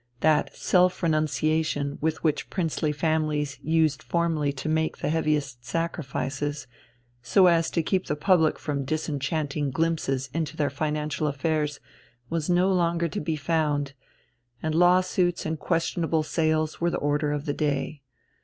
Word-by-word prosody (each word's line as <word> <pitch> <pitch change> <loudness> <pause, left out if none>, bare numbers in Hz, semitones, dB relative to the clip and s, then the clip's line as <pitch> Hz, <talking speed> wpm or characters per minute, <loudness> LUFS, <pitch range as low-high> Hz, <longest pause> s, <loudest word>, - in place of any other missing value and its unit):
That 155 -1 +2
self 180 0 +2
renunciation 155 -2 0
with 160 +1 -1
which 155 -3 0
princely 165 -4 -1
families 150 -2 -1
used 155 -1 +2
formerly 165 -4 0
to 135 +2 -6
make 160 0 0
the - - -2
heaviest 150 -6 -1
sacrifices, 145 -1 -3 0.6
so 120 +11 +4
as 170 -2 +4
to 165 - 0
keep 185 +3 0
the 150 - 0
public 160 0 +3
from 140 -2 -3
disenchanting 145 0 -2
glimpses 135 -4 -1
into 160 -1 -3
their 145 -3 0
financial 150 +1 -2
affairs, 150 +1 -1 0.5
was 165 0 -1
no 180 +2 +3
longer 170 -2 +1
to - - -3
be 160 +1 -1
found, 150 -2 0 0.7
and 155 0 0
law 175 +2 +5
suits 180 -1 0
and 160 -1 -2
questionable 165 -1 0
sales 155 0 0
were 170 - +3
the - - -1
order 145 +1 0
of 145 0 -3
the 145 - -1
day. 145 0 -2
155 Hz, 145 wpm, -26 LUFS, 145-165 Hz, 0.7 s, law